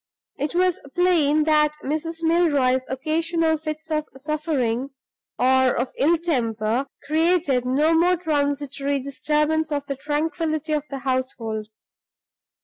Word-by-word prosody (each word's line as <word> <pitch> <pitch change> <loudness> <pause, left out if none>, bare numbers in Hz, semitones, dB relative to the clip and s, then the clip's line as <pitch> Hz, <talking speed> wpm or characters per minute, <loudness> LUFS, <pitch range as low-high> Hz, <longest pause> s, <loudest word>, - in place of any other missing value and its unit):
It 295 +4 -2
was 365 -1 +2 0.2
plain 320 -4 +3
that 300 -1 +3
Mrs. 325 +3 -3
Milroy's 285 -7 +2
occasional 320 +4 0
fits 310 +1 -6
of 305 -1 0
suffering 275 -4 -1 0.5
(or 260 0 +3
of 245 +1 -2
ill 330 +5 +3
temper) 240 -6 -1 0.2
created 310 -4 +2
no 295 +6 +3
mere 350 +2 +3
transitory 285 -3 -1
disturbance 300 +4 0
of 285 -1 -2
the 275 - -3
tranquillity 310 +2 -2
of 300 -1 -1
the 275 - -4
household. 255 -5 -3
300 Hz, 120 wpm, -23 LUFS, 265-320 Hz, 0.5 s, plain